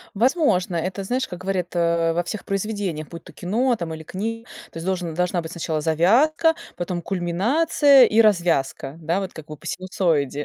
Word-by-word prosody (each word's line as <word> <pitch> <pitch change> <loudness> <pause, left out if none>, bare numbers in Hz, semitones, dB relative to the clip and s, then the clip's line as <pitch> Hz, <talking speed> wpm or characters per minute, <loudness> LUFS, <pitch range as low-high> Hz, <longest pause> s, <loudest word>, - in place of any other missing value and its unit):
Возможно, 225 - +2
это 185 +4 -3
знаешь, 255 +6 -1
как 180 - -7
говорят, 185 -2 -2
э, 170 -1 +2
во 175 - 0
всех 200 +4 -5
произведениях, 195 -6 -3
будь 170 -1 -9
то 180 - -13
кино 230 - 0
там 170 -5 -5
или 160 - -8
книга. 225 +7 -5 0.2
То - - -19
есть 165 - -6
должен 180 -4 -2
должна 180 +1 0
быть 160 - -8
сначала 160 -2 -2
завязка, 240 - +3 0.2
потом 175 0 -3
кульминация 250 - +4
и 220 +2 +3
развязка. 170 -9 +1
Да, 165 +4 0
вот 190 -2 -5
как 160 -1 -11
вы 150 - -8
по - - -15
синусоиде. 160 -6 -1
180 Hz, 185 wpm, -23 LUFS, 165-215 Hz, 0.2 s, кульминация